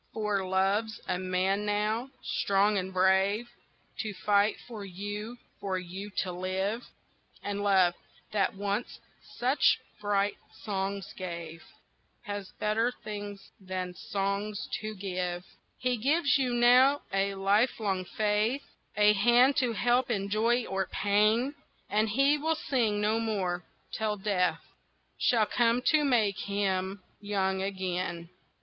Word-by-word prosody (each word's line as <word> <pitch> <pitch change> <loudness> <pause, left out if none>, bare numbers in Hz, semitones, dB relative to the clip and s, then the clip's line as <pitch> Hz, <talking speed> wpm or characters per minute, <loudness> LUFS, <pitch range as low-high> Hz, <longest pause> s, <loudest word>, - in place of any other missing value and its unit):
For 210 -3 0
Love's 195 +4 0
a 180 - -1
man 185 +2 0
now, 210 +4 0
strong 200 +1 +2
and 185 0 -4
brave, 190 +4 +3 0.5
To 215 -3 -3
fight 205 +2 +2
for 225 -4 -7
you, 205 +5 -6 0.2
for 190 -2 -2
you 185 +3 -6
to 185 - -4
live, 190 +5 -2 0.6
And 205 0 -3
Love, 190 -3 +4 0.4
that 200 -2 +1
once 200 +3 -3 0.4
such 255 +4 +3 0.2
bright 205 -1 0 0.3
songs 195 -1 -3
gave, 170 -3 -6 0.6
Has 205 -2 -5
better 225 +3 +1
things 205 -1 -7
than 185 -2 -4
songs 200 +2 -3
to 215 0 -5
give; 180 -2 -3 0.3
He 250 -1 0
gives 280 +5 +2
you 260 -3 +1
now 250 +4 +5
a 195 0 +1
lifelong 200 -1 +1
faith, 215 +7 0 0.3
A 210 0 +6
hand 240 +6 +5
to 250 -3 +2
help 245 +4 +2
in 200 -4 -1
joy 230 +3 +2
or 190 -1 -2
pain, 215 +6 +2 0.4
And 215 +2 +2
he 275 +6 +3
will 320 +2 +1
sing 225 -9 0
no 215 +2 +2
more, 190 -6 -1 0.3
till 215 -1 -1
Death 190 -3 0 0.6
Shall 225 -3 +3
come 235 +2 +2
to 305 -1 +5
make 225 -8 +2
him 195 -1 -1 0.2
young 190 -2 -1
again! 185 -3 -3
205 Hz, 130 wpm, -29 LUFS, 190-225 Hz, 0.6 s, A